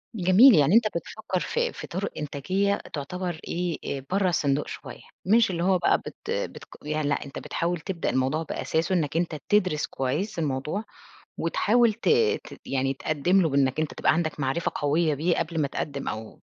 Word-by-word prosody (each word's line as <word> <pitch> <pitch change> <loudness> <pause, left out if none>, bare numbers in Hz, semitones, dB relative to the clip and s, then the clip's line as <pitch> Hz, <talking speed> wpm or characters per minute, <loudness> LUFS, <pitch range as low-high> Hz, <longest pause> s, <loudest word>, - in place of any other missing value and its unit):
جميل، 200 +7 +7
يعني 155 +4 +4
أنت 230 -2 +6
بتفكّر 185 +1 -4
في 480 - -1
في - - -8
طُرق 190 +3 -3
إنتاجية 185 +8 -1
تُعتَبر 175 +3 -4
إيه، 175 -1 -2 0.2
آآ، 135 - -14
برّا 190 -1 +2
الصندوق 145 -4 0
شوية، 130 -4 -8 0.2
مش 225 +1 +4
اللي 170 -1 -2
هو 185 0 +4
بقى 175 - +3
بت - - -10
بتق - - -5
يعني 150 0 -1
لأ، - - 0
أنت 140 - -7
بتحاول 175 0 -2
تبدأ 180 0 -3
الموضوع 135 +5 0
بأساسه 165 +3 -1
إنَّك 155 -1 0
أنت 170 -2 -1
تدْرِس 185 -7 +2
كويِّس 150 +10 -2
الموضوع، 150 +6 -2 0.6
وتحاول 235 +1 +3
ت 230 - -3 0.4
ت - - -12
يعني 135 0 0
تقدِّم 155 +7 +1
له 160 - +2
بإنَّك 140 0 +1
أنت 155 - -2
تبقى - - +3
عندك 160 -2 -1
معرفة 135 +5 -1
قوية 155 +2 +1
بيه 165 +5 +1
قبل 165 -1 -1
ما 140 - +1
تقدِّم 140 0 -4
أو 110 0 -7
165 Hz, 180 wpm, -26 LUFS, 145-185 Hz, 0.6 s, جميل